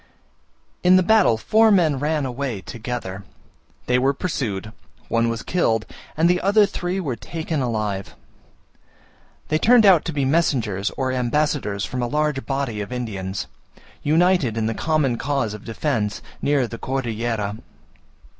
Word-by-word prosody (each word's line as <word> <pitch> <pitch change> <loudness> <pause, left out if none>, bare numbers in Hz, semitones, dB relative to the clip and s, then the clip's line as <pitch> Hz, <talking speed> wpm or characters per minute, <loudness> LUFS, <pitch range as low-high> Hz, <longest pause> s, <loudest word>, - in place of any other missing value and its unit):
In 180 +1 +6
the 185 - +5
battle 205 - +4
four 220 - +4
men 165 -9 +3
ran 150 0 0
away 125 -5 -3
together. 110 -5 -6 0.6
They 125 0 +2
were 135 +2 +2
pursued, 110 - -3 0.4
one 115 0 +2
was 115 -1 -3
killed, 115 -11 +1 0.3
and 165 +2 +4
the 180 0 +2
other 205 +2 +5
three 185 -1 -3
were 140 -10 -2
taken 160 +2 -4
alive. 110 -5 -2 1.3
They 155 - +2
turned 235 +2 +6
out 185 -5 +6
to 165 - -2
be 140 -3 -1
messengers 120 - +1
or 130 -1 0
ambassadors 130 -5 0
from 125 - -4
a 120 - 0
large 150 0 -1
body 135 -6 -2
of 100 - -6
Indians, 100 -6 -4 0.6
united 160 - +2
in 110 - 0
the 115 - 0
common 145 -4 0
cause 135 -5 -1
of 105 0 -10
defence, 115 -3 -2 0.2
near 140 -3 +2
the 115 0 -8
Cordillera. 115 -5 -2
130 Hz, 145 wpm, -22 LUFS, 115-155 Hz, 1.3 s, In